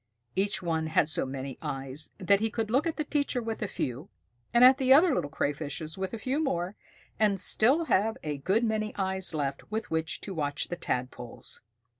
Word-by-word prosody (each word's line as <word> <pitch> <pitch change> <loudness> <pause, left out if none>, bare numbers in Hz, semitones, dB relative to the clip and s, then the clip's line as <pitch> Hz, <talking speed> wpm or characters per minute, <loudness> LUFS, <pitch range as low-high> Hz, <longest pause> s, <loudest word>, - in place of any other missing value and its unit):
Each 195 0 0
one 160 -2 0
had 155 -1 +3
so 155 - -1
many 135 0 -6
eyes 135 +3 -4
that 200 +1 +3
he 225 +1 0
could 220 -1 -2
look 270 +7 +3
at 325 - -1
the 305 - 0
teacher 285 -3 0
with 225 -2 -4
a - - 0
few, 130 +9 -4 0.4
and 235 +1 +5
at 260 +2 +8
the 260 -1 +2
other 310 +4 +7
little 145 - -1
Crayfishes 150 +2 -3
with 190 0 -3
a 230 - -4
few 265 +7 -1
more, 180 - -1 0.4
and 205 -3 +3
still 265 - +3
have 225 -4 +2
a 150 -2 -2
good 195 - +1
many 215 -1 -1
eyes 190 -3 -1
left 140 -2 -3
with 220 0 -3
which 160 0 -1
to 195 - -5
watch 145 -4 -2
the 175 - -2
Tadpoles. 125 -5 -4
190 Hz, 200 wpm, -29 LUFS, 150-230 Hz, 0.4 s, at